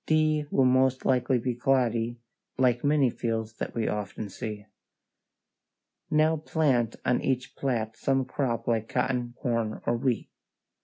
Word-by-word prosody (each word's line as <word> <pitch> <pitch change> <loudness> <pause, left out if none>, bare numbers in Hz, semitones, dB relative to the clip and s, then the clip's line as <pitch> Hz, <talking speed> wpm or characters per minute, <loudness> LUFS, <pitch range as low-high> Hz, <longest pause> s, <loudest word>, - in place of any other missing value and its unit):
D 155 -1 +2
will 135 - +3
most 130 0 +3
likely 130 0 +2
be 125 +1 -1
cloddy, 120 -2 +1 0.4
like 125 -2 +2
many 145 -3 +3
fields 115 -2 -3
that - - -5
we 115 -2 0
often 105 0 -3
see. 105 +1 -6 1.4
Now 155 +1 +3
plant 140 -7 +1
on 125 - +2
each 130 -1 -1
plat 115 -5 -1
some 135 -1 +1
crop 120 -3 -2
like 115 -2 0
cotton, 125 -2 -1
corn, 115 -3 -1
or 120 - +2
wheat. 120 -1 -1
125 Hz, 140 wpm, -28 LUFS, 115-135 Hz, 1.4 s, will